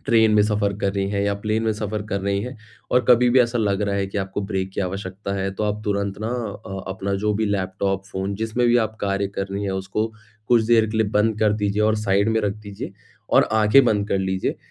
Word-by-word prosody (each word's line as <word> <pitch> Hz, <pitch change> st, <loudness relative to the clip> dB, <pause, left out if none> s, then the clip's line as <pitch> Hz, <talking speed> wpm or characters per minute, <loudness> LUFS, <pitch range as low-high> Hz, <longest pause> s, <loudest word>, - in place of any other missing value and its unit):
Train 110 Hz, -1 st, +4 dB
में 105 Hz, -, +5 dB
सफ़र 105 Hz, -1 st, +1 dB
कर 100 Hz, -1 st, 0 dB
रही 100 Hz, -1 st, -1 dB
हैं 100 Hz, -1 st, -1 dB
या 100 Hz, 0 st, +1 dB
प्लेन 110 Hz, +2 st, 0 dB
में 110 Hz, -1 st, +1 dB
सफ़र 105 Hz, 0 st, -3 dB
कर 100 Hz, -1 st, -2 dB
रही 100 Hz, 0 st, 0 dB
हैं, 125 Hz, +1 st, -6 dB, 0.3 s
और 125 Hz, 0 st, +3 dB
कभी 125 Hz, 0 st, +6 dB
भी 130 Hz, -, +5 dB
ऐसा 120 Hz, 0 st, +1 dB
लग 100 Hz, -1 st, +1 dB
रहा 100 Hz, -1 st, 0 dB
है 100 Hz, 0 st, 0 dB
कि 100 Hz, -, -4 dB
आपको 95 Hz, +1 st, -3 dB
ब्रेक 95 Hz, -2 st, -2 dB
की -, -, -3 dB
आवश्यकता 95 Hz, +1 st, -4 dB
है, 95 Hz, 0 st, -1 dB
तो 105 Hz, -, -2 dB
आप 105 Hz, 0 st, -1 dB
तुरंत 100 Hz, -1 st, -1 dB
ना 110 Hz, -, -2 dB
अ, 105 Hz, -5 st, -5 dB
अपना 95 Hz, +1 st, -2 dB
जो 105 Hz, -, +2 dB
भी 110 Hz, +1 st, 0 dB
लैपटॉप, 95 Hz, 0 st, -1 dB
फ़ोन 95 Hz, +1 st, -3 dB
जिसमें 110 Hz, +3 st, 0 dB
भी 120 Hz, -, +4 dB
आप 110 Hz, 0 st, -7 dB
कार्य 100 Hz, 0 st, 0 dB
कर 100 Hz, -, -1 dB
रहीं 100 Hz, +1 st, -3 dB
हैं, 100 Hz, -, -1 dB
उसको 95 Hz, +3 st, -2 dB, 0.4 s
कुछ 120 Hz, -2 st, +5 dB
देर 115 Hz, -1 st, +4 dB
के 110 Hz, -, -3 dB
लिए 110 Hz, -1 st, +2 dB
बंद 105 Hz, +1 st, +1 dB
कर 105 Hz, -1 st, +4 dB
दीजिए 105 Hz, +1 st, +1 dB
और 110 Hz, 0 st, +3 dB
साइड 100 Hz, 0 st, +1 dB
में 110 Hz, 0 st, +2 dB
रख 100 Hz, -2 st, -1 dB
दीजिए। 100 Hz, -1 st, -7 dB, 0.4 s
और -, -, +5 dB
आँखें 110 Hz, +5 st, +5 dB
बंद 105 Hz, -3 st, +1 dB
कर 100 Hz, -, +1 dB
लीजिए, 95 Hz, 0 st, -1 dB
100 Hz, 250 wpm, -22 LUFS, 100-110 Hz, 0.4 s, कभी